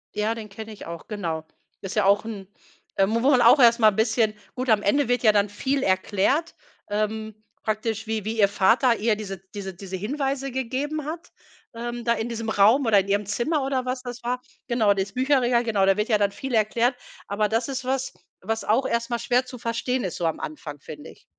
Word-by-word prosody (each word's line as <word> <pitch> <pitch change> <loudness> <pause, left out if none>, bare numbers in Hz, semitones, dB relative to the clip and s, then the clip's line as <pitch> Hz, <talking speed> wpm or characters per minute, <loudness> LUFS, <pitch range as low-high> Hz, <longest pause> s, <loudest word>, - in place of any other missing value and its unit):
Ja, 210 +2 0
den 220 -2 -8
kenne 220 +2 -8
ich 210 - -10
auch, 170 0 -8
genau. 165 -7 -4 0.4
Ist 195 +2 -6
ja 210 - +2
auch 200 +2 +4
’n 205 -4 -7 0.5
äh, 195 - +4
mo 225 +3 0
wo 275 - +5
man 255 -3 +5
auch 285 - +7
erst 235 -1 +6
mal 215 -1 +6
bisschen 220 +1 +1 0.2
gut, 255 0 -3
am 215 -2 +4
Ende 260 +6 +2
wird 245 0 +1
ja 215 - +7
dann 205 -1 +2
viel 265 +6 -1
erklärt, 200 - +1 0.3
ähm, 215 +1 -2 0.3
praktisch 220 +1 -2
wie 220 -2 -2
wie 220 +1 -3
ihr 200 - +6
Vater 230 +5 +3
ihr 220 0 +1
diese 195 -2 -6 0.2
diese 195 -2 -6
diese 190 +1 -7
Hinweise 270 +5 -2
gegeben 270 +4 -3
hat, 330 +3 -7 0.4
ähm, 240 +1 -5
da 235 0 +2
in 220 +1 -3
diesem 230 -1 -4
Raum 220 +6 +4
oder 205 -3 +6
in 195 - -2
ihrem 205 +1 +1
Zimmer 270 +7 0
oder 265 -2 -1
was 255 0 -2
das 245 -1 -8
war. 250 +1 -2 0.3
Genau, 225 -4 +3
dieses 195 0 -3
Bücherregal, 255 -2 +2
genau, 205 -4 +2
da 195 0 +4
wird 210 +3 -1
ja 215 - +4
dann 200 -1 +1
viel 270 +4 -6
erklärt, 230 +3 +2 0.3
aber 205 +1 0
das 225 +3 0
ist 260 -1 -4
was, 265 0 -1 0.3
was 225 +3 -2
auch 235 +5 +2
erst 235 +1 -1
mal 235 - 0
schwer 245 +2 +1
zu 250 0 -9
verstehen 235 +2 -1
ist, 185 - -3
so 175 - -2
am 160 - -1
Anfang, 150 -1 -7
finde 150 0 -10
ich. - - -21
225 Hz, 220 wpm, -24 LUFS, 205-250 Hz, 0.5 s, auch